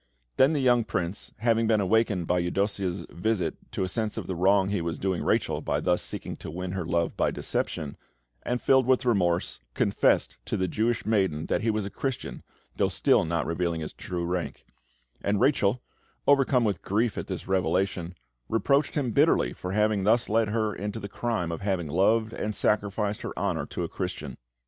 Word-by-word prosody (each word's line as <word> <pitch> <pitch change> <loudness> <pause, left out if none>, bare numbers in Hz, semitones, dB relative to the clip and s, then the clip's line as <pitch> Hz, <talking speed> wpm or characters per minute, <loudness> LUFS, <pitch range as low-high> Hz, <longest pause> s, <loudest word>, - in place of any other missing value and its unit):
Then 135 +4 +5
the 150 - +1
young 120 -2 +4
Prince, 90 -3 -3
having 115 0 +2
been 110 -1 +3
awakened 100 -2 +2
by 90 +2 +1
Eudossia's 95 +1 -1
visit 105 +1 -1 0.2
to - - -2
a - - 0
sense 110 +2 -2
of - - -3
the 95 - -3
wrong 95 +2 +3
he 100 -3 0
was 85 0 -3
doing 95 -3 -1
Rachel - - +1
by - - -1
thus 90 0 +1
seeking - - -5
to - - -8
win 90 +3 -4
her 95 -1 -2
love 85 -1 0
by - - +2
deception, 75 -2 -3 0.5
and 125 0 -1
filled 130 -1 +4
with 130 -1 +3
remorse, 90 -7 +1 0.2
confessed - - +2
to - - -2
the 95 - 0
Jewish 115 +5 0
maiden 95 -8 +1
that - - +1
he 115 - +1
was 105 -2 0
a 100 - -5
Christian, 135 -3 -4 0.4
though - - +2
still - - +3
not 85 +1 -1
revealing 85 -1 -1
his 75 - -6
true 90 -2 -4
rank; 85 -5 -3 0.6
and 100 0 +1
Rachel, 125 -4 +2 0.4
overcome 135 -3 +4
with 100 -6 0
grief 110 +3 0
at - - -4
this - - -5
revelation, 95 -1 0 0.3
reproached 140 +6 +2
him 135 -6 0
bitterly - - +3
for 90 - -6
having 105 -1 +2
thus 115 +4 +3
led 110 +1 +2
her 110 0 0
into 105 +2 -4
the 100 - -7
crime 110 -6 -2
of 85 - -5
having 95 -4 -1
loved 110 +8 +2
and 110 0 -3
sacrificed 105 0 0
her - - -6
honour 85 -7 -1
to - - -4
a - - -2
Christian. 65 - -5
100 Hz, 190 wpm, -27 LUFS, 90-115 Hz, 0.6 s, Then